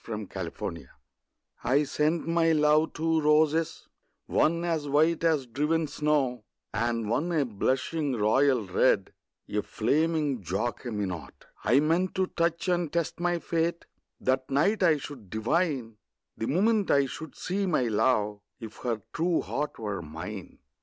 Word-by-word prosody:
The 110 -2 -4
White 105 -3 -6
Flag 85 -5 -5 0.8
I 135 +5 +3
sent 155 +3 0
my 165 -1 +3
love 150 +1 +3
two 160 0 +1
roses, 155 +1 +2 0.4
one 170 +2 +2
As 160 -4 -1
white 160 +4 +3
as 155 -5 +2
driven 150 +7 0
snow, 140 -5 0 0.3
And 115 0 -1
one 145 +10 0
a 155 -4 +2
blushing 130 +6 -1
royal 120 +2 +3
red, 95 +1 +2 0.3
A 105 - -1
flaming 150 +3 0
Jacqueminot. 100 -1 -4 0.2
I 135 +4 +4
meant 170 +5 +1
to 190 - +2
touch 170 0 -1
and 175 -4 +1
test 170 -1 -2
my 175 0 +1
fate; 170 0 -1 0.3
That 130 0 0
night 155 +11 +2
I 165 -4 +5
should 135 -8 -9
divine, 120 - -1 0.4
The 110 - -3
moment 205 - +2
I 140 -1 +4
should 145 +5 -8
see 195 +2 -2
my 155 -7 +2
love, 105 -2 +1 0.2
If 110 -3 -9
her 115 -4 -3
true 170 +1 +1
heart 150 +1 -3
were 105 -4 -4
mine. 85 +5 -8
145 Hz, 145 wpm, -28 LUFS, 115-165 Hz, 0.8 s, I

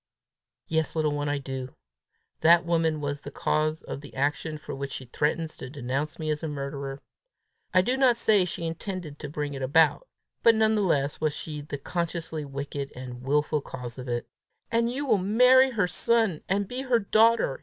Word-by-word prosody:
"Yes, 160 0 0
little 155 -2 +1
one, 145 0 -1
I 145 - 0
do. 130 -2 -6 0.6
That 170 +2 +6
woman 165 -2 +1
was 145 0 -3
the - - -7
cause 155 +1 0
of 140 - -6
the 145 - -12
action 145 +3 -1
for 150 - -8
which 140 0 -5
she 130 - -6
threatens 155 +5 -1
to 130 - -7
denounce 140 +2 -3
me 155 -1 -2
as 150 - -2
a 160 - -3
murderer. 140 -1 -5 0.7
I 185 - +5
do 250 +6 +1
not 260 -3 +4
say 215 -4 +4
she 170 -1 -4
intended 165 -2 -5
to 150 - -6
bring 145 0 -3
it 135 - -6
about; 155 - +3 0.3
but 230 -1 +6
none 220 0 +3
the 215 - +2
less 145 -7 +1
was 155 -2 +1
she 150 -2 -5
the 145 0 -6
consciously 165 0 -3
wicked 140 0 -5
and 125 -1 -8
wilful 150 +3 +1
cause 125 -2 -8
of 130 - -7
it. 120 -1 -2 0.4
And 230 +1 +2
you 280 +3 -3
will 215 -7 +3
marry 250 +7 +6
her 210 -7 +1
son, 220 -1 +1
and 200 +1 +1
be 250 +4 -4
her 255 -3 +2
daughter!" 220 -6 +3
155 Hz, 195 wpm, -27 LUFS, 140-195 Hz, 0.7 s, That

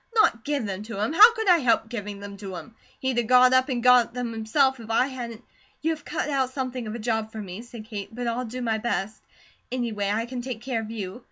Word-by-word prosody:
NOT 430 - +4
GIVE 285 -5 -1
THEM 195 -1 -4
TO 215 -1 -7
HIM! 215 +8 0
How 435 +7 +9
could 445 -2 -2
I 355 -2 +6
help 230 -4 +2
giving 210 -3 -6
them 200 0 -8
to 195 -2 -7
him? 230 +6 -9 0.3
He'd 260 -2 0
a - - +1
got 250 +2 +6
up 260 +2 +4
and 245 -3 -1
got 250 -2 +5
them 245 -2 -3
himself 255 +4 +1
if 225 -1 -10
I 230 +3 +3
hadn't 245 -3 -7 0.2
" - - -36
"You 325 - +2
have 310 -2 -5
cut - - -3
out 270 -3 +1
something 255 -3 -4
of 215 - -5
a - - -3
job 220 -1 -2
for 220 - -7
me," 195 0 -7
said 235 -2 -10
Kate, 210 -3 -6
"but 245 +2 -5
I'll 235 +2 -1
do 250 +2 -5
my 220 -2 0
best. 215 -2 -2 0.5
Anyway, 225 -5 -1
I 220 +3 0
can 245 0 -5
take 245 -3 -5
care 245 -3 -1
of 220 - -7
you. 205 -2 -5
235 Hz, 260 wpm, -25 LUFS, 220-255 Hz, 0.5 s, How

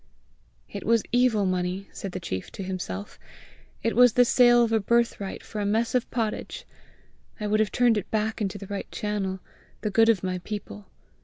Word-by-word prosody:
"It - - -7
was 230 -2 +3
evil 245 -4 +3
money!" 185 +1 -2
said 195 - -6
the 185 - -5
chief 95 - -5
to 195 - -6
himself; 175 - -5 0.6
"it 230 - 0
was 245 -1 +6
the 245 - +5
sale 240 0 +5
of 230 - 0
a 225 - +3
birthright 230 -2 0
for 215 - -5
a - - -1
mess 225 +3 +1
of 250 -2 0
pottage! 225 -3 -3 0.7
I 210 - -3
would 210 +1 +1
have 215 -1 +1
turned 240 -3 +3
it 200 - -9
back 220 +1 -1
into 200 -1 -2
the 200 - -8
right 200 0 -6
channel, 200 -3 -3 0.4
the 210 - -2
good 225 +3 +5
of 210 -5 +3
my 185 -1 -2
people! 175 - -7
210 Hz, 190 wpm, -26 LUFS, 190-230 Hz, 0.7 s, was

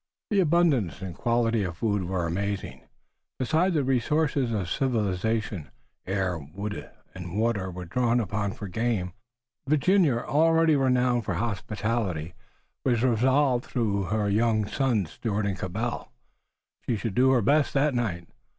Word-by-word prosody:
The 205 - +3
abundance 150 - +2
and 95 -2 -5
quality 115 +3 +1
of 90 -3 -2
the - - -21
food 105 -2 0
were 90 -1 -1
amazing. 100 +4 -3 0.6
Besides 165 +8 +1
the 145 - +2
resources 135 0 +1
of 100 -5 -1
civilization, 105 - -1 0.4
air, 95 -3 -1
wood 100 +9 -6 0.2
and 90 +2 -6
water 110 -5 0
were 90 0 -7
drawn 120 +6 +1
upon 100 -2 -2
for 105 - -7
game. 100 -2 -1 0.5
Virginia, 155 0 +3
already 160 +4 +3
renowned 125 -3 +2
for 95 - -1
hospitality, 105 -4 -2 0.5
was 120 -3 +1
resolved 130 +1 +2
that - - -18
through 105 -5 0
her 105 +3 0
young 110 +1 +2
sons, 110 - 0
Stuart 105 -2 -2
and 100 -2 -2
Cabell, 110 +7 -3 0.8
she 120 - +1
should 110 0 -3
do 130 +4 +4
her 130 -4 +3
best 145 +5 +3
that 140 +1 +3
night. 95 -9 -2
115 Hz, 145 wpm, -26 LUFS, 95-130 Hz, 0.8 s, do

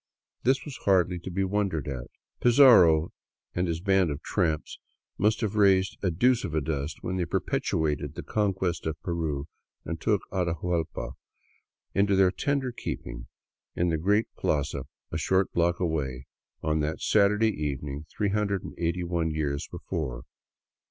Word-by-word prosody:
This 130 +2 +2
was 145 -4 -7
hardly 90 -2 +2
to 90 - -7
be 95 +2 -1
wondered 95 -7 -1
at. 65 -4 -4 0.3
Pizarro 110 - +6 0.4
and 90 +1 0
his 85 -1 -1
band 95 -2 +3
of 75 +1 -5
tramps 80 -6 -1 0.4
must 105 +4 +2
have 110 -3 -1
raised 95 -2 +4
a 95 - +1
deuce 120 +9 +3
of 80 - -3
a - - +3
dust 75 0 -3
when 95 +1 -2
they 90 - 0
perpetrated 75 -3 -1
the - - -6
Conquest 95 -6 -1
of 80 -1 -3
Peru 80 -5 -2 0.4
and 80 - -4
took 105 -3 +1
Atahuallpa 85 -2 -1 0.8
into 100 0 +3
their 95 -1 +5
tender 135 +3 -1
keeping - - -6 0.5
in 85 0 +1
the 80 - +1
great 105 +6 +3
plaza 75 -2 -1 0.3
a - - -2
short 95 0 +1
block 85 0 +2
away, 70 -7 -2 0.4
on 80 0 +1
that 75 +1 -1
Saturday 105 +1 +3
evening, 70 +1 -4
381 90 -5 -1
years 75 -2 -2
before. 65 -7 -4
85 Hz, 145 wpm, -27 LUFS, 80-100 Hz, 0.8 s, Pizarro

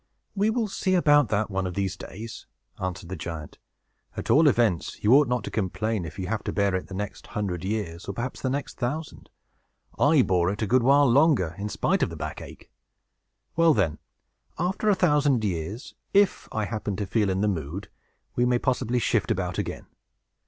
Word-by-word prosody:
"We 205 +2 +2
will 225 -1 0
see 190 -1 0
about 145 -6 +4
that, 105 0 0
one 95 -1 -1
of 90 - -6
these 95 -2 -1
days," 110 +3 -9 0.3
answered 90 -2 -4
the 95 - -4
giant. 80 -2 -7 0.6
"At - - -2
all 155 +1 +6
events, 115 - +2
you 105 +4 +5
ought 145 0 +6
not 125 -2 -1
to - - -6
complain, 110 0 -1
if 80 +2 -9
you 95 - -3
have 110 +3 -2
to - - -1
bear 100 -2 +1
it 95 - -2
the 95 - -8
next 105 +1 -5
hundred 90 -5 -2
years, 95 -4 -3
or 100 - -4
perhaps 120 +6 -5
the 130 - 0
next 140 +1 -4
thousand. 145 +6 -4 0.7
I 145 -2 +5
bore 90 -3 +2
it 105 +3 -2
a - - +2
good 125 +5 +3
while 140 +3 +5
longer, 125 - +4
in 105 +1 -3
spite - - 0
of - - +2
the - - -7
back - - -5
ache. - - -12 0.8
Well, 165 -1 +5
then, 90 -8 0 0.6
after 185 +5 0
a 205 - +5
thousand 145 -9 +3
years, 95 - -3 0.2
if 200 -1 +3
I 110 -1 -1
happen 105 -2 -3
to 100 +1 -3
feel 105 +1 +1
in 95 +1 0
the 105 - +2
mood, 85 0 -3 0.5
we 120 - +2
may 125 0 +3
possibly 125 -1 0
shift 115 - +1
about 90 -1 -1
again. - - -4
110 Hz, 200 wpm, -26 LUFS, 95-140 Hz, 0.8 s, all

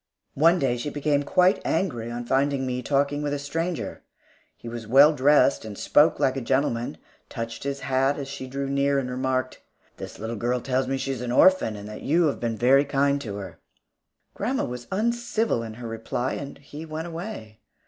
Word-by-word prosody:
One 165 +5 +4
day 130 -6 0
she 135 +5 -3
became 145 0 0
quite 180 +6 +3
angry 130 -10 -1
on 120 0 -5
finding 135 +1 +1
me 125 0 -2
talking 145 +2 0
with 145 -1 -1
a - - -2
stranger. 165 +5 -3 0.6
He - - -11
was 115 -1 -6
well 140 +6 +7
dressed 145 0 +4
and 105 -2 -8
spoke 150 +2 +3
like 130 - +2
a 135 - -2
gentleman, 120 - 0 0.3
touched 115 +3 -6
his 140 0 -3
hat 135 +1 +1
as 140 -2 -5
she 135 -1 -7
drew 135 +1 -3
near 140 0 +1
and 125 -2 -2
remarked, 130 0 -2 0.4
"This - - -8
little 110 +1 -5
girl 120 +3 0
tells 130 +1 -1
me 135 +1 -1
she 135 +1 -3
is 130 -3 -4
an 125 -1 -3
orphan, 160 -5 +4
and 100 0 -8
that 105 0 -8
you 165 +5 +2
have 145 - 0
been 115 -2 -2
very 135 +4 +5
kind 140 0 +1
to 105 -6 -5
her." 100 -1 -8 0.7
Grandma 250 +6 -1
was 120 -1 -7
uncivil 230 - 0
in 110 -1 -7
her 120 0 -7
reply, 115 +3 -3
and 140 -1 -6
he 145 +2 -10
went 160 0 -5
away. 165 - -7
135 Hz, 200 wpm, -25 LUFS, 120-145 Hz, 0.7 s, well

